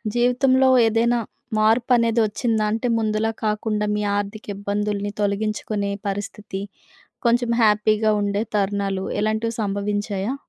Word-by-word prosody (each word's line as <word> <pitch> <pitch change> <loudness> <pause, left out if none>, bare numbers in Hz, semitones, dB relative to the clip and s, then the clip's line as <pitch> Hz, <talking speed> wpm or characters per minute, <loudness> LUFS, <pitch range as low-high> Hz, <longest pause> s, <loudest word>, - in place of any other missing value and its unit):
జీవితంలో 260 +2 +3 0.2
ఏదైనా 235 +2 +2 0.4
మార్పనేది 230 +1 +3
ఒచ్చిందా? 220 0 0
అంటే, 230 +2 -1
ముందులాగ 220 0 0
కాకుండా, 210 0 -1
మీ 210 - -1 0.2
ఆర్థిక 205 +1 -4
ఇబ్బందులుని 205 0 -2
తొలగించుకునే 205 0 -1 0.2
పరిస్థితి, 205 -1 -5 0.7
కొంచెం 235 0 +2
హ్యాపీగా 215 0 +3
ఉండే 205 +1 0
తరుణాలు, 195 -1 -1 0.2
ఇలాంటివి 220 +2 -1
సంభవించాయా? 205 +2 -2
215 Hz, 105 wpm, -22 LUFS, 205-230 Hz, 0.7 s, జీవితంలో